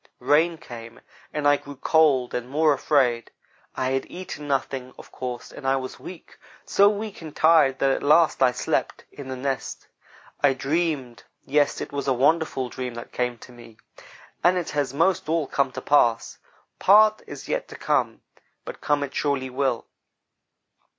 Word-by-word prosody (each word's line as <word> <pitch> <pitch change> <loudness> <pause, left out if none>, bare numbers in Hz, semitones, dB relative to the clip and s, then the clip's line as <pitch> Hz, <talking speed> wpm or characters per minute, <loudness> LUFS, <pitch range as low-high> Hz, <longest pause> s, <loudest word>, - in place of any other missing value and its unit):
Rain 155 +6 +2
came, 115 -4 -11 0.3
and 150 -1 -1
I 145 0 +5
grew 145 0 -11
cold 140 -3 +2
and 125 0 -4
more 150 +2 +3
afraid. 130 -4 +1 0.5
I 130 0 -1
had 135 0 -2
eaten 170 -5 -8
nothing, 135 -2 -2
of - - -14
course, 125 -2 -6
and 135 - -7
I 135 - +3
was 130 -1 -5
weak 180 -3 -12 0.3
so 200 +1 +5
weak 210 -1 -5
and 155 -2 -9
tired, 155 -5 +4
that 135 0 +2
at - - -1
last 155 +2 +4
I 130 -1 +5
slept, - - -2
in 140 -2 -10
the 130 - -4
nest. 135 0 -4 0.5
I 135 -2 +3
dreamed; 140 -3 -2 0.2
yes, 145 +1 +1
it - - -6
was 140 -1 -3
a 135 - +3
wonderful 135 0 +1
dream 125 0 -6
that 120 - -9
came 125 -1 -2
to 125 - -14
me, 120 -2 -15 0.7
and 180 +1 +4
it 175 - -3
has 145 -3 -1
most 165 +3 +1
all 160 -2 +1
come 135 0 0
to - - -6
pass. 120 -6 +2 0.4
Part 215 +2 +5
is - - -9
yet - - -2
to - - -11
come. - - -1 0.4
But - - -8
come 145 -1 +1
it 140 -1 -6
surely 135 -3 -1
will. 130 -2 -1
140 Hz, 175 wpm, -24 LUFS, 130-160 Hz, 0.7 s, I